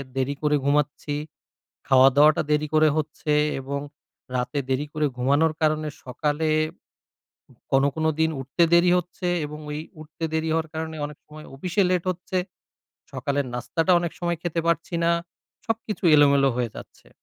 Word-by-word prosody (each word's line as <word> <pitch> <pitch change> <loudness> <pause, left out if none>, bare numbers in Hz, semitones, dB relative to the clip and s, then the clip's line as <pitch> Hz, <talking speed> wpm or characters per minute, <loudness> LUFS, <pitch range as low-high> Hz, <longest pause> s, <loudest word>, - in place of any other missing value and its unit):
দেরি 135 +2 -1
করে 150 -1 +2
ঘুমাচ্ছি, 145 0 0 0.7
খাওয়া-দাওয়াটা 135 +3 +6
দেরি 150 0 +2
করে 155 0 +5
হচ্ছে 150 0 -3 0.3
এবং 140 +1 -4 0.6
রাতে 125 +4 -1
দেরি 130 +3 0
করে 155 -1 0
ঘুমানোর 145 +5 +2
কারণে, 155 0 +1 0.2
সকালে 150 +5 -1 1.2
কোন, 135 0 +5
কোন 160 0 -2 0.2
দিন 160 - +3
উঠতে 135 +6 -1
দেরি 175 +1 +5
হচ্ছে 180 +1 -5 0.2
এবং 150 +1 -8
ওই 150 - -3 0.2
উঠতে 155 +1 -7
দেরি 160 0 0
হওয়ার 160 0 0
কারণে, 160 0 -4
অনেক 150 0 -11
সময় 155 0 -12
অফিসে 180 +8 0
লেট 180 -2 +1
হচ্ছে। 180 +1 -5 0.8
সকালের 140 -2 -1
নাস্তাটাও 165 +8 +2
অনেক 170 -2 -3
সময় 170 -1 -1
খেতে 170 -1 -2
পারছি 170 +1 0
না, 170 - +3 0.5
সবকিছু 225 -2 -3
এলোমেলো 140 -2 +5
হয়ে 120 -2 0
যাচ্ছে। - - -13
155 Hz, 145 wpm, -24 LUFS, 140-165 Hz, 1.2 s, খাওয়া-দাওয়াটা